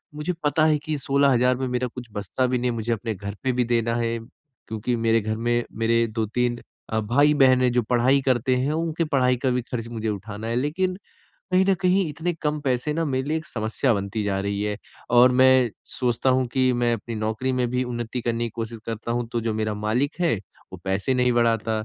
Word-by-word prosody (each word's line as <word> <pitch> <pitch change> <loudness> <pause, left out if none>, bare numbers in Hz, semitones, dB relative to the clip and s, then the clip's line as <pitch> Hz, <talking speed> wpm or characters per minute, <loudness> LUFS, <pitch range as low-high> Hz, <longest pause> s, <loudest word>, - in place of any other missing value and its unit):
मुझे 155 +4 -2
पता 150 +2 +2
है 155 -1 +4
कि 155 0 -3
16 140 0 +2
हज़ार 125 +1 +3
में 130 0 -2
मेरा 125 0 -1
कुछ 125 0 -9
बचता 105 +5 -1
भी 125 0 0
नहीं 125 0 0
है - - -4
मुझे 115 +1 -2
अपने 115 +1 -3
घर 100 +1 -6
पे 130 - +2
भी 125 0 +1
देना 115 -1 +1
है। 115 0 -1 0.5
क्योंकि 110 +3 -2
मेरे 115 -1 +2
घर 110 +1 -2
में 120 +1 +1
मेरे 115 +1 +2
2-3 120 +2 -1 0.3
अ, 110 - 0
भाई-बहन 130 +3 +4
हैं 125 -1 +3
जो 125 0 +2
पढ़ाई 130 +3 +3
करते 130 0 +2
हैं 135 +4 0
उनके 165 +1 -1
पढ़ाई 130 -4 +2
का 130 +1 0
भी 125 0 0
खर्च 115 -2 -3
मुझे 110 -2 -3
उठाना 105 +2 -5
है, 115 - -1
लेकिन 180 +8 0 0.6
कहीं 185 +1 +5
न 195 - +5
कहीं 185 -1 +2
इतने 160 +4 -2
कम 150 0 0
पैसे 130 +1 0
ना 165 +2 -1
मेरे 135 -2 -1
लिए 155 - +1
एक 155 - -10
समस्या 110 +3 0
बनती 100 +1 -3
जा 100 -1 0
रही 100 +1 -2
है। 105 0 -1 0.3
और 125 +1 +6
मैं 130 -1 +5 0.3
सोचता 125 +1 +1
हूँ 130 0 +2
कि 130 -1 +3
मैं 120 -1 +1
अपनी 115 +1 -6
नौकरी 110 +4 -1
में 125 -1 +1
भी 125 +1 0
उन्नति 120 0 -4
करने 120 0 -1
की 115 - -3
कोशिश 115 0 -4
करता 115 +1 -3
हूँ 120 0 -1
तो 120 - 0
जो 115 -1 -2
मेरा 110 -1 -1
मालिक 120 +10 -1
है, 170 -10 +2 0.4
वो - - -6
पैसे 95 +7 0
नहीं 125 0 +2
बढ़ाता 115 -2 +1
120 Hz, 225 wpm, -24 LUFS, 115-130 Hz, 0.6 s, और